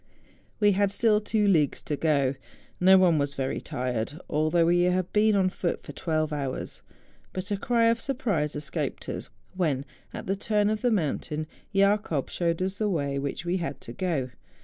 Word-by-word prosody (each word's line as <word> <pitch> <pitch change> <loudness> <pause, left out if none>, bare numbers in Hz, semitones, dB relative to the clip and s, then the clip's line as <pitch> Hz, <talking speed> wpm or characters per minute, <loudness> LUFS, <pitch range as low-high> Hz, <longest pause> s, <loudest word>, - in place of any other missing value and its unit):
We 205 -1 +5
had 200 +1 +2
still 210 +1 +2
two 210 0 +1
leagues 155 -7 +3
to 150 - -2
go. 140 -4 +2 0.5
No 190 +1 +7
one 175 -4 +4
was 140 0 -1
very 135 -1 -2
tired, 125 +3 -3
although 155 +3 +2
we 175 +1 +3
had 180 0 +1
been 215 0 +4
on 190 -2 +3
foot 175 - -2
for - - -8
twelve 155 -2 -1
hours; 140 -3 -4 0.5
but 185 +2 -4
a - - +2
cry 230 +3 +2
of 230 0 +3
surprise 205 - -1
escaped 150 0 -4
us - - -5 0.2
when, 150 -8 0 0.3
at - - -7
the 195 - 0
turn 210 +1 +1
of 215 - -2
the 245 - +3
mountain, 155 - -1 0.3
Jacob 200 -7 +1
showed 170 0 0
us 190 +1 -3
the 215 -1 +1
way 140 -6 -1
up - - -1
which 140 +4 -4
we 175 +2 +1
had 165 -6 -4
to 115 - -8
go. 145 -6 -1
175 Hz, 190 wpm, -27 LUFS, 150-200 Hz, 0.5 s, No